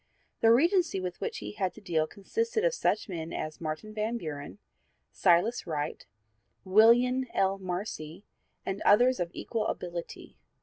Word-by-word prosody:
The 225 - +5
'Regency' 335 - +3
with 180 -1 -5
which - - -3
he 105 0 -6
had 180 - -2
to - - -11
deal 165 -6 0
consisted 455 - -2
of - - +3
such 475 - 0
men 165 -4 -5
as 155 +1 -5
Martin 155 +7 -5
Van 220 +2 -1
Buren, 150 -4 -7 0.5
Silas 185 +5 +2
Wright, 150 -3 -4 0.6
Willian 240 +6 +5
L. 195 0 +2
Marcy 180 -2 -5 0.4
and 195 +1 -3
others 245 +4 +5
of 175 -1 -1
equal 220 +2 -3
ability. 175 -1 -6
195 Hz, 145 wpm, -29 LUFS, 170-235 Hz, 0.6 s, The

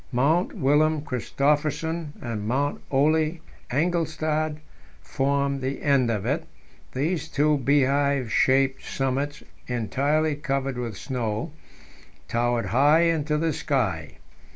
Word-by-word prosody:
Mount 145 +8 +2
Wilhelm 150 +2 +2
Christophersen 150 +4 -1
and 110 -4 -4
Mount 140 +5 0
Ole 155 +4 +2 0.3
Engelstad 155 0 0 0.4
formed 140 - -1
the 130 +1 -3
end 140 -4 +3
of 105 -3 -1
it; 145 +6 -1 0.5
these 155 +4 -1
two 150 0 +2
beehive 140 -2 +2
shaped 135 0 +2
summits, 135 +2 -2 0.2
entirely 140 +6 0
covered 135 -3 -2
with 115 -5 -4
snow, 120 - -3 0.8
towered 120 -1 0
high 145 - +4
into 155 -3 +1
the 160 0 0
sky. 115 - -2
140 Hz, 105 wpm, -25 LUFS, 130-155 Hz, 0.8 s, high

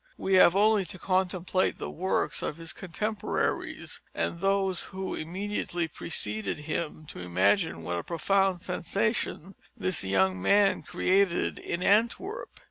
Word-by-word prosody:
We 195 - -1
have 185 -1 +7
only 210 0 +4
to 180 - -6
contemplate 185 0 0
the - - -5
works 170 -5 -1
of 150 - -3
his 165 -1 -6
contemporaries, 210 +4 -3
and 170 - -2
those 195 -1 +1
who 190 0 -5
immediately 175 0 -3
preceded 110 -9 -3
him, 155 +1 -4
to - - -8
imagine 90 - +1
what 85 +1 -2
a - - -5
profound 190 +2 +1
sensation 195 0 -1 0.2
this 185 -2 +1
young 95 -1 +2
man 200 - +4
created 185 -2 +1
in 175 - -3
Antwerp. 360 - +1
185 Hz, 130 wpm, -28 LUFS, 160-195 Hz, 0.2 s, have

